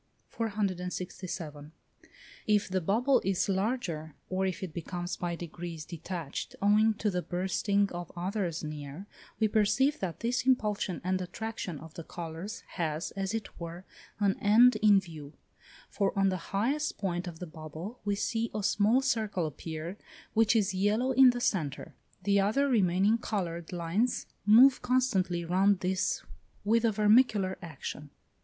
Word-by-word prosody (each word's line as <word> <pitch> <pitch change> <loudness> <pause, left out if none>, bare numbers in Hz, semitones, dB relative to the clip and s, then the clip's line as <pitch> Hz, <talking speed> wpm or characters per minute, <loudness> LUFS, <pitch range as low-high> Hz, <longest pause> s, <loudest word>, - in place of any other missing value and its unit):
467. 180 -7 -4 0.8
If 210 -1 +3
the 185 0 0
bubble 235 - +3
is 190 -1 +1
larger, 190 - -2 0.2
or 190 +1 +1
if 185 0 -4
it 175 -4 -5
becomes 175 +2 -4
by 175 -1 -3
degrees 170 -1 -7
detached, 170 -2 -5
owing 210 +2 +4
to 210 0 0
the 180 -1 -1
bursting 190 +3 0
of 175 -1 -6
others 180 -2 -2
near, 150 +3 -6 0.3
we 220 - +4
perceive 220 +8 +2
that 180 -4 -4
this 245 +2 0
impulsion 210 -7 +1
and 185 +1 0
attraction 190 -2 -5
of 160 +1 -11
the 165 - -7
colours 170 +6 -7
has, 160 -1 -2
as 195 +2 -3
it 220 -5 -6
were, 170 +2 -7 0.3
an 200 -2 +1
end 230 +4 +6
in 210 -2 +6
view; 155 -5 -10 0.5
for 200 -1 -1
on 195 0 +4
the 185 -3 -4
highest 265 +10 0
point 180 -2 -2
of 170 -2 -7
the 180 - -6
bubble 160 +7 -8
we 205 0 0
see 225 +3 -1
a 210 - -2
small 215 +6 +3
circle 220 -9 0
appear, 160 +4 -6 0.4
which 225 +1 +4
is 205 -3 +2
yellow 210 +7 +1
in 265 -1 +7
the 245 0 0
centre; 155 - -1 0.3
the 200 +1 +3
other 220 +9 +2
remaining 205 -2 +3
coloured 170 -7 -3
lines 180 +8 0 0.2
move 250 +5 +7
constantly 195 -9 +1
round 190 +3 +3
this 190 +2 0 0.4
with 230 +2 +3
a 225 - +4
vermicular 210 -2 +3
action. 150 -3 -7
195 Hz, 150 wpm, -30 LUFS, 175-215 Hz, 0.8 s, in